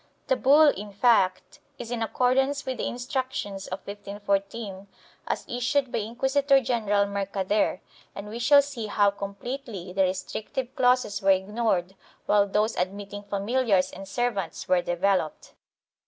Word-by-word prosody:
1 - - -42
The 260 - +4
bull, 290 +5 +6
in 205 -5 -4
fact, 195 -4 +2 0.2
is 240 -1 -7
in 240 -2 -2
accordance 265 +5 +1
with 260 -1 -3
the - - -1
Instruc 255 +1 -3
tions 195 -1 -5
of 185 +1 -6
1514, 200 0 -4 0.4
as - - -2
issued 255 +2 0
by - - 0
Inquisitor 265 +5 +2
general 215 -5 +1
Mercader, 200 -1 -1 0.3
and 200 +1 -7
we 220 +3 -6
shall 280 +4 +6
see 260 -6 -5
how 205 -1 +3
completely 200 -1 -6
the 195 - +1
restrictive 220 +7 -2
clauses 250 -6 +2
were 195 - +2
ignored 190 -1 +1 0.3
while 205 -1 +3
those 210 +3 +1
admitting 200 +2 -3
familiars 200 -1 +1
and 195 - -9
servants 200 -6 -2
were 180 -1 +3
developed. 175 -2 -1
210 Hz, 145 wpm, -26 LUFS, 195-250 Hz, 0.4 s, bull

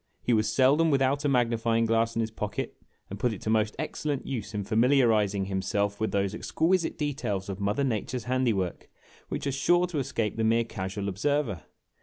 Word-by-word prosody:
He 125 - +2
was 110 -1 +2
seldom 140 +7 +4
without 140 0 +2
a - - +3
ma^ni 120 -3 +2
o - - +1
fying 115 0 +1
glass 115 0 +1
in 115 - +1
his 110 0 -2
pocket, 105 -1 -4 0.4
and 100 - -6
put 120 0 +1
it 100 - -8
to 110 - -1
most 110 -1 +1
excellent 150 -2 -3
use 115 -5 -4
in 105 - -1
famil 115 +6 +3
iarizing 105 -6 +2
himself 100 +1 -1
with 110 - -1
those 100 0 0
exquisite 170 +9 0
details 135 -10 -2
of 95 0 -4
Mother 105 +7 0
Nature's 125 0 -2
handiwork 120 -8 -1 0.4
which - - -3
are 140 - 0
sure 175 +6 +3
to 170 -4 -3
escape 115 -5 -2
the 115 - 0
mere 115 +1 +3
casual 100 -2 -4
observer." 110 - -1
115 Hz, 200 wpm, -28 LUFS, 105-135 Hz, 0.4 s, seldom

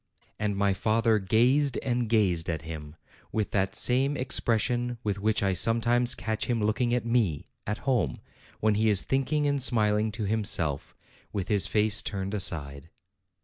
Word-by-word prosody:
And 105 -2 -2
my 100 -1 +2
father 110 +2 +1
gazed 125 +8 +2
and 120 -3 -1
gazed 95 -8 +1
at 80 -2 -3
him, 80 -2 -8 0.4
with 110 -2 -2
that 95 -1 -1
same 135 +3 +1
expression 120 -1 0
with 100 -2 -2
which 105 0 0
I 95 -1 +1
sometimes 120 +4 +2
catch 110 0 -3
him 120 -2 0
looking 110 +3 0
at 120 -1 0
me, 115 -11 0 0.2
at 105 +1 -2
home, 120 - 0 0.4
when 110 0 +2
he 110 +1 +1
is 100 -3 +3
thinking 140 +3 0
and 140 -1 0
smiling 110 -3 +2
to 110 - -4
himself, 95 -9 +1 0.4
with 100 -2 -4
his 100 -4 +2
face 105 0 +2
turned 100 -1 -4
aside. 80 -6 0
110 Hz, 160 wpm, -27 LUFS, 100-120 Hz, 0.4 s, is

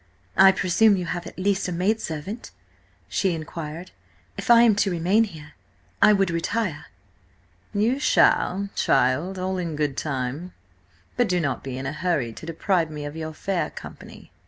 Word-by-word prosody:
"I 195 0 +8
presume 195 +3 +3
you 180 - -3
have 175 0 -4
at - - -11
least 195 +1 0
a - - -3
maidservant," 185 +1 -2 0.6
she 190 -3 0
inquired. 160 +2 -7 0.4
"If - - -7
I 235 0 +8
am 230 -2 +6
to 200 - +2
remain 185 +6 +2
here, 155 -6 -12 0.5
I - - +7
would 195 -3 +2
retire." 170 0 -2 0.8
"You 225 +6 +1
shall, 200 -10 +3
child, 135 +9 +1
all 185 0 -2
in 170 -3 -3
good 145 -2 -1
time. 140 +5 -3 0.6
But - - +2
do 180 -1 +2
not 145 -6 -2
be 130 -2 -5
in 130 - -5
a 135 - -3
hurry 150 -8 -1
to 160 - -10
deprive 165 0 0
me 150 -1 -6
of 145 +1 -6
your 160 -1 -5
fair 190 0 -2
company." - - -12
175 Hz, 165 wpm, -24 LUFS, 155-195 Hz, 0.8 s, I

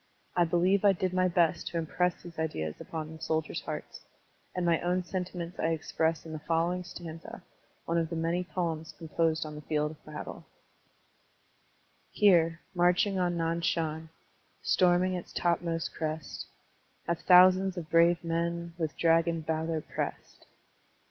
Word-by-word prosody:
I 175 - +4
believe 180 +4 +2
I 200 -1 +6
did 185 0 -2
my 185 0 +3
best 170 -1 +2
to 170 - -3
impress 170 +2 0
these 170 -2 -10
ideas 80 - -2
upon 160 -1 -6
the 160 - -14
soldiers' 160 0 -1
hearts; 150 -1 -7 0.5
and 180 -1 0
my 170 -1 +3
own 180 +1 0
sentiments 180 -1 -5
I - - +1
express 160 +1 -1
in 160 - -7
the 155 - -4
following 170 +3 0
stanza, 170 -2 -9 0.4
one 170 0 +1
of 165 -1 -1
the 170 - -4
many 165 +2 0
poems 165 -3 -3
composed 160 0 0
on 155 - -7
the 150 - -8
field 150 0 -1
of 155 - -15
battle: 150 0 -8 1.6
Here, 170 -5 +4
marching 180 +2 +3
on 175 -1 +1
Nan 165 0 0
Shan, 160 -2 -1 0.5
Storming 180 0 +3
its 180 - -5
topmost 170 -1 -1
crest, 155 -1 -4 0.6
Have 170 -1 0
thousands 185 +1 +6
of 165 -3 -6
brave 170 +1 +5
men 170 0 -2
With 160 -2 -2
dragon 165 0 +3
valor 160 0 -1
pressed. - - -6
170 Hz, 150 wpm, -30 LUFS, 160-180 Hz, 1.6 s, I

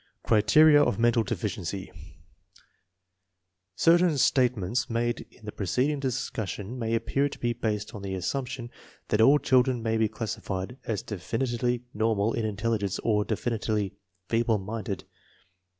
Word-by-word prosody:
Criteria 145 +8 +6
of 120 -8 +2
mental 120 0 +3
deficiency. 100 -4 -4 1.8
Certain 170 - +4
statements 125 -2 +2
made 120 0 -1
in 110 - -18
the 105 - -5
preceding 130 +10 0
discussion 120 -4 -3
may 115 -1 0
appear 135 +5 0
to - - -9
be 120 0 -1
based 105 -3 -3
on 105 - -7
the 95 -1 -4
assumption 120 +6 -3 0.4
that 105 - +2
all 135 +6 +7
children 130 -3 +2
may 110 0 +1
be 110 0 +3
class 110 0 -4
ified 95 +6 -5
as 105 -4 -2
definitely 120 +4 -2
normal 110 0 +1
in 115 - -1
intelligence 105 -2 -1
or 105 -2 +2
definitely 110 -2 -1 0.3
feeble 115 -1 +2
minded. 105 0 -5
115 Hz, 135 wpm, -27 LUFS, 105-125 Hz, 1.8 s, all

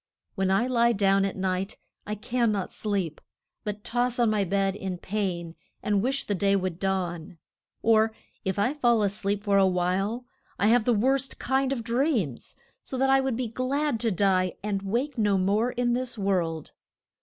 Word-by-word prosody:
When 190 -2 0
I 195 +5 +3
lie 235 -2 +3
down 195 -1 +3
at 195 - -3
night 190 +1 -2 0.3
I 210 - -2
can 235 +2 0
not 200 -3 -3
sleep, 195 -7 -2 0.4
but 210 -1 -5
toss 245 0 0
on 235 -3 +3
my 210 -2 +2
bed 195 +1 0
in 190 -3 -4
pain 180 -4 -3 0.3
and 205 -2 +1
wish 270 +4 0
the 205 - -2
day 200 +1 +2
would 185 -3 -2
dawn. 180 -3 -2 0.5
Or, 220 0 +4 0.3
if 190 -1 -2
I 240 +7 +2
fall 240 -7 +3
a 200 - +3
sleep 205 0 -2
for 200 -2 +3
a 190 - +5
while, 190 +6 0 0.3
I 205 - +3
have 235 -1 +4
the 245 - +3
worst 260 +4 +1
kind 265 +1 0
of 250 -4 -2
dreams, 235 - -1 0.3
so 260 - -5
that 270 +1 +3
I 270 0 +5
would 265 -3 -1
be 245 0 -2
glad 255 +3 -1
to 230 0 +1
die 185 -2 +1
and 205 -2 -1
wake 240 +7 -2
no 205 -2 +3
more 205 +6 +1
in 245 -1 0
this 250 -1 -2
world. 175 -6 -1
210 Hz, 190 wpm, -27 LUFS, 195-245 Hz, 0.5 s, a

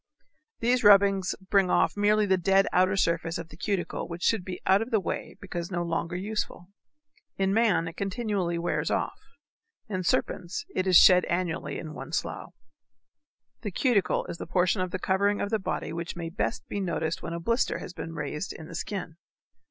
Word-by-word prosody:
These 245 +1 +2
rubbings 195 -2 +5 0.2
bring 195 -3 +4
off - - +2
merely 210 +1 +3
the 190 -1 +3
dead 195 +2 +3
outer 185 +2 +4
surface 165 -2 0
of 165 -1 -7
the 155 - -13
cuticle 190 +1 -2
which 170 0 -7
should 225 -5 +2
be 180 0 -6
out 195 +2 +4
of 225 - -3
the 220 - +2
way 190 - -4
because 175 -3 -5
no 175 -2 -1
longer 170 +1 -2
useful. 190 -2 -4 0.7
In 195 0 +1
man 200 -7 +3
it 165 - -8
continually 195 -4 -1
wears 170 - -1
off, - - -2 0.7
in 185 -3 -2
serpents 180 - -1
it 185 - -1
is 185 - +7
shed 180 -1 +8
annually 175 -1 -2
in 155 -2 -7
one - - -8
slough. - - -3 1.1
The 210 - -3
cuticle 205 -1 +1
is 170 - -7
the - - -6
portion 180 +2 +2
of 185 - -1
the 185 - -3
covering 200 +3 +1
of 200 - -2
the 220 - +1
body 190 - -3
which 170 +1 -4
may 170 -1 -4
best 215 +5 -2
be 205 - -3
noticed 165 -4 -2
when 170 - -5
a 170 - -3
blister 230 +8 0
has - - -8
been 165 -1 -7
raised 150 +4 -4
in 160 - -10
the - - -10
skin. 175 -2 -5
185 Hz, 190 wpm, -27 LUFS, 170-205 Hz, 1.1 s, shed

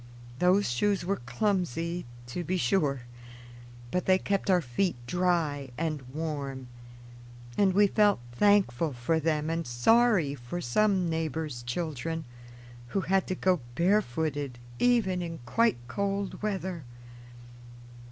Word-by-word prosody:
Those 185 +3 +4
shoes 185 +10 +1
were 195 -3 -1
clumsy, 175 - -1 0.2
to 125 +9 -4
be 185 +3 -1
sure; 150 -8 +1 0.9
but 180 - -1
they 185 0 +6
kept 200 +1 -1
our 185 -1 +5
feet 165 +5 -1
dry 160 -3 0
and 155 -3 -2
warm, 140 -4 -4 0.9
and 195 -2 +3
we 205 +2 +6
felt 205 - +3
thankful 165 -3 +3
for 125 +7 0
them 155 -1 0
and 165 -1 -2
sorry 170 - +3
for 135 +6 -6
some 185 - +2
neighbors' 160 -5 -2
children, 155 +4 -3 0.6
who 190 +11 -1
had 190 0 +1
to 185 - -1
go 185 -1 +2 0.2
barefooted 155 - 0 0.2
even 220 -7 +3
in 165 -1 -5
quite 230 - +2
cold 200 +8 -2
weather. 190 -5 -3
170 Hz, 125 wpm, -29 LUFS, 145-195 Hz, 0.9 s, they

